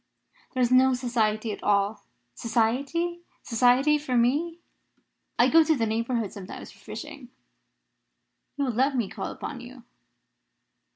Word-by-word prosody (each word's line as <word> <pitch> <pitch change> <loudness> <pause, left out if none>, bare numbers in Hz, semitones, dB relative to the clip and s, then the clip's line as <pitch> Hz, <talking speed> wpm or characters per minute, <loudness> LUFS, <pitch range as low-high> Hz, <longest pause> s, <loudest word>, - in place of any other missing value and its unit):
"There 255 - +2
is 245 - +1
no 260 0 +5
society 225 -3 0
at - - -7
all." 205 +1 0 0.3
"Society? 275 - -1 0.2
Society 255 +5 +3
for 260 -4 -1
me?" 295 +8 +1 0.8
"I - - +5
go 325 0 +6
to 315 0 +2
the 230 -4 0
neighbourhood 230 -1 -1
sometimes 195 -2 -9
for - - -20
fishing. 290 -5 -9 1.3
You 285 - 0
will 255 - 0
let 265 +4 +1
me 235 -5 0
call - - -5
upon 265 -5 -7
you?" 250 0 -12
250 Hz, 135 wpm, -26 LUFS, 230-280 Hz, 1.3 s, go